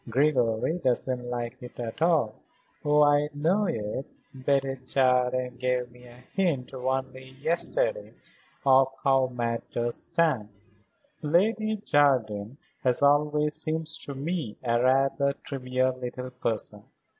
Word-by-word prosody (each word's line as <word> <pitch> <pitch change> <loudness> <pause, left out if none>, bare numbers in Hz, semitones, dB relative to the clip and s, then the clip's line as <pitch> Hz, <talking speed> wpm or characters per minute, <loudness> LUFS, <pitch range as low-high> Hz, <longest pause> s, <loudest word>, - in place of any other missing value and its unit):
Gregory 130 +2 +1
doesn't 125 -3 0
like 120 +1 -4
it 125 0 -11
at 115 +4 -5
all. 160 -10 +3 0.5
Oh, 150 0 +4
I 145 0 +3
know 175 +8 +2
it. 110 -2 -3 0.3
Betty 135 0 0
Jardine 125 -1 +1
gave 125 -1 -1
me 125 0 -16
a 120 +1 -15
hint 165 -11 0
only 130 0 -4
yesterday - - 0 0.5
of 135 -1 +6 0.2
how 135 -2 +4
matters 120 -1 -2
stand." 155 - 0 0.7
"Lady 215 +8 +2
Jardine 130 - +1 0.3
has 125 +2 +2
always 150 +1 +3
seemed 160 +1 -1
to 150 -3 -2
me 145 -5 -3
a 120 -1 +1
rather 135 +2 +2
trivial 130 -2 -1
little 125 0 -6
person. 110 -4 -3
130 Hz, 120 wpm, -27 LUFS, 125-150 Hz, 0.7 s, of